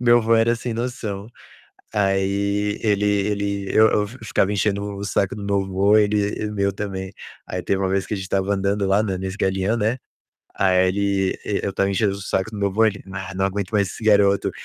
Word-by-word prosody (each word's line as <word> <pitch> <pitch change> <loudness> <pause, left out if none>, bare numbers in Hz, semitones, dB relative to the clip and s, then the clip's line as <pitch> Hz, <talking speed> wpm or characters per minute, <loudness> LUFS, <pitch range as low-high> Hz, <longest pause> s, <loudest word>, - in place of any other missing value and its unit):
Meu 120 -1 +5
avô 115 0 +2
era 115 +1 +3
sem 120 0 -4
noção. 110 -4 -4 0.7
Aí 100 +1 0
ele 105 -2 +1
ele 100 -1 0
eu 110 0 +7
eu 105 0 +1
fi-ficava 110 -3 -1
enchendo 100 0 -1
o 100 - -6
saco 100 -1 0
do 105 - -7
meu 100 -1 +1
avô, 95 +2 +3
ele 105 -1 +2
e 105 - -1
o 105 - -6
meu 100 -1 +1
também. 95 -1 -5 0.3
Aí - - -4
teve 95 0 -1
uma 95 - 0
vez 95 +1 0
que - - -4
a 105 - -1
gente 95 +1 -7
tava 100 +1 +1
andando 100 0 0
lá 100 +3 +3
na 95 -3 -2
nesse 95 +1 -5
Galeão, 95 +3 0
né. 110 +3 0 0.6
Aí 95 -1 +3
ele 100 0 +1
e 100 - -1
eu 100 - -2
tava 100 0 +1
enchendo 100 +1 +1
o 100 - -8
saco 95 +2 -1
do 110 - -8
meu 100 0 +1
avô, 110 +4 +2
ele: 105 -2 -2
"Ah, 95 0 -6
não 95 - 0
aguento 100 +1 -2
mais 100 -3 +2
esse - - -9
garoto". 100 -2 +3
100 Hz, 220 wpm, -22 LUFS, 95-105 Hz, 0.7 s, eu